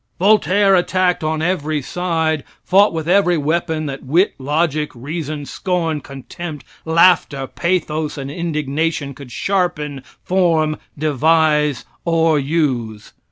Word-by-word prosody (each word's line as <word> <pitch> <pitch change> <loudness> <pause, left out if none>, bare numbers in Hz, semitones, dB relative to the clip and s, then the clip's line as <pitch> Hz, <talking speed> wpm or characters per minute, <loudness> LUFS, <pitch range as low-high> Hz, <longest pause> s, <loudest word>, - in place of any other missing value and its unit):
Voltaire, 200 0 +4
attacked 180 -1 +2
on 155 0 -1
every 155 -4 0
side, 160 0 -1 0.2
fought 200 +3 +4
with 160 -1 -4
every 180 -1 +3
weapon 160 +1 -1
that 135 -2 -5
wit, 170 +10 +2
logic, 150 +2 0
reason, 150 +3 -5
scorn, 165 -2 -2
contempt, 145 +3 -8 0.2
laughter, 160 -4 +3
pathos 160 -1 -2
and 140 0 -5
indignation 155 -2 -2
could 135 -2 -12
sharpen, 150 - -1 0.2
form, 165 -5 +1 0.2
devise 150 0 +2 0.2
or 165 -2 +2
use. 130 -8 -2
155 Hz, 115 wpm, -19 LUFS, 145-175 Hz, 0.2 s, Voltaire